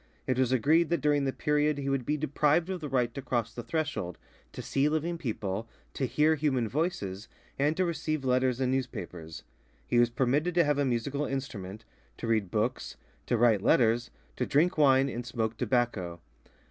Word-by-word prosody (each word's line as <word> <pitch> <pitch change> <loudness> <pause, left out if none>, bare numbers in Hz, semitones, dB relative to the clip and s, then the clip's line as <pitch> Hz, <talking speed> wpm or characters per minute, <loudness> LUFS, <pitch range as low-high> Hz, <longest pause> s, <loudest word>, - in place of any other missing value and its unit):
It 130 -1 0
was 130 -1 +2
agreed 155 +6 +3
that 170 - +1
during 145 -1 +2
the 135 - +1
period 150 +1 +1
he 140 -1 -4
would 135 -3 -1
be 150 - +1
deprived 155 +4 +1
of 185 -2 -4
the 150 - -4
right 125 -3 +1
to 140 - -5
cross 120 -3 -2
the 120 - -5
threshold, 120 - -3 0.3
to - - -7
see 140 +2 +1
living 165 +2 -1
people, 110 - -3 0.2
to 130 - -1
hear 150 +6 +3
human 135 -6 0
voices, 115 - -2 0.3
and 150 +3 +2
to 185 - +2
receive 155 -4 -2
letters 130 0 +2
and 130 -1 +1
newspapers. 90 -11 -4 0.4
He 120 - +2
was 120 -1 +4
permitted 140 +8 0
to 175 - +5
have 145 -1 +1
a 145 - +2
musical 135 +4 -1
instrument, 110 -7 -5 0.3
to - - -6
read 110 -4 +1
books, 110 +5 -2 0.3
to 120 - +1
write 110 -3 +4
letters, 120 +2 +3 0.3
to - - -1
drink 170 +6 +3
wine 135 -3 +5
and 120 -2 -4
smoke 115 -2 -2
tobacco. 110 -8 -1
130 Hz, 185 wpm, -29 LUFS, 115-150 Hz, 0.4 s, to